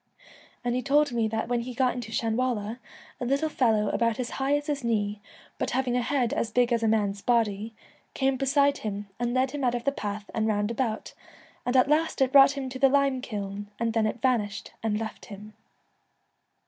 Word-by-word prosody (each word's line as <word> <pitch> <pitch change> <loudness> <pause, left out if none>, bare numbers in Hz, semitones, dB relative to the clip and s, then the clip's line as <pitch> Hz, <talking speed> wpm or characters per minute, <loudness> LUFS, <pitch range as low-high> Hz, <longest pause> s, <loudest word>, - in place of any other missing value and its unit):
An' 240 - +1
he 250 - 0
told 290 +1 +3
me 230 -2 +1
that 220 0 -2
when 240 0 0
he 245 +1 -7
got 255 0 +2
into 240 -3 -6
Shanwalla, 230 -1 -1 0.4
a 250 - -3
little 280 +4 +1
fellow 220 -7 +2
about 230 0 0
as 245 - -3
high 275 +2 +2
as 290 - -5
his 290 -3 -2
knee, 210 -3 -1 0.4
but - - -1
having 255 -2 0
a 250 - +2
head 250 0 0
as 235 -6 -1
big 245 +2 +2
as 230 - +1
a 225 - +1
man's 205 -2 +1
body, 225 -2 0 0.4
came 270 0 +1
beside 280 +2 +2
him 205 -1 -5
and 240 0 -1
led 260 0 +2
him 290 -1 -4
out 245 -1 +2
of 240 - -3
the 280 - +2
path 205 -5 -5
an' 220 0 0
round 205 0 0
about, 230 -2 -2 0.5
and 250 +1 +3
at 255 - +5
last 310 +3 +1
it 265 -1 +3
brought 275 0 +7
him 270 -1 -3
to 260 0 -7
the 270 0 +5
lime 275 -1 +2
kiln, 205 -3 -5
and 230 -1 0
then 225 -1 +2
it 220 +3 -5
vanished 210 -6 0
and 215 -1 0
left 220 -1 -6
him.' 210 +1 -10
240 Hz, 210 wpm, -27 LUFS, 215-265 Hz, 0.5 s, brought